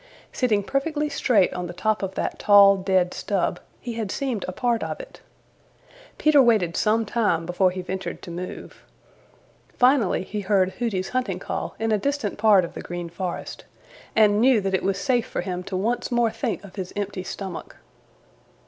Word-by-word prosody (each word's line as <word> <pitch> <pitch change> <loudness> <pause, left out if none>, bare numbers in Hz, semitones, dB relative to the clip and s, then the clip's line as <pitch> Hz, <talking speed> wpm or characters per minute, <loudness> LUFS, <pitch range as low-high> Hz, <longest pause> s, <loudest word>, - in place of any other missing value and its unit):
Sitting 215 -6 +1
perfectly 295 +5 -1
straight 220 -9 +2
on 180 -1 -4
the 175 - -7
top 215 +3 0
of 190 -1 -4
that - - -3
tall, 200 -1 +7
dead 185 -2 +1
stub 200 -4 -1 0.2
he 240 - -6
had 225 -3 -3
seemed 250 -3 -2
a - - -3
part 235 +3 0
of - - -4
it. - - -11 1.0
Peter 305 -2 +5
waited 215 -9 +3
some 220 +1 +2
time 205 -7 0
before 180 +2 +2
he 185 0 -5
ventured 190 +1 -5
to 175 - -8
move. 180 +2 -7 1.0
Finally 250 -7 +3
he 210 +2 -5
heard 190 -2 +2
Hooty's 200 -6 -1
hunting 255 0 -1
call - - -5
in 225 0 -1
a 215 - +2
distant 280 -5 -2
part 205 -4 +5
of - - -10
the - - -7
Green 175 -1 -6
Forest, 175 +1 -5 0.5
and 210 -1 +4
knew 255 -2 +5
that 195 -1 -2
it 190 - +2
was 195 0 0
safe 240 +3 0
for - - -3
him 180 -2 -4
to 190 - -3
once 230 +7 -1
more 240 -2 +2
think 225 -1 -3
of 200 0 -13
his 185 -2 -5
empty 205 -2 -3
stomach. 185 -1 -7
205 Hz, 185 wpm, -24 LUFS, 185-235 Hz, 1.0 s, tall